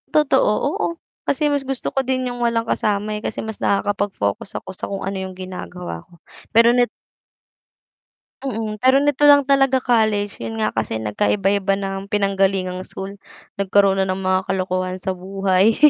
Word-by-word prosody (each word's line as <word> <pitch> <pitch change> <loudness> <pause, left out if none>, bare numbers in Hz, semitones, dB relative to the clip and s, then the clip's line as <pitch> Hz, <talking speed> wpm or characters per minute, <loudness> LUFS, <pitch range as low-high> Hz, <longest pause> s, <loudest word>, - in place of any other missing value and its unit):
Totoo, 290 -6 +3 0.2
oo, 415 - 0 0.4
kasi 300 +2 +1
mas 285 - +1
gusto 270 -2 -4
ko 270 - +2
din 260 0 -1
'yung 245 -1 -4
walang 235 -1 +1
kasama, 210 0 0
eh, 210 - -4
kasi - - -4
mas 220 -1 -7
nakakapag-focus 200 - -1
ako - - -9
sa - - -6
kung 195 - -4
ano 195 0 -3
'yung 190 -1 -7
ginagawa 180 - -7
ko 170 - -19 0.3
pero 230 +1 +5
net 245 0 +2 1.5
Mm, 220 -5 -4
pero 260 +1 +5
nito 290 -1 0
lang 285 0 +7
talaga 270 -1 +4
college, 215 -4 +1
'yun 110 -1 -4
nga, 110 - +1
kasi 110 0 -2
nagkaiba-iba 195 - +1
ng 195 0 -4
pinanggalingang 195 -2 +1
school, 195 +1 -7 0.5
nagkaroon 195 0 +3
ng 185 0 -1
mga 185 0 +2
kalokohan 185 -1 -1
sa 190 +1 -3
buhay. 195 +3 +2
200 Hz, 160 wpm, -21 LUFS, 185-235 Hz, 1.5 s, lang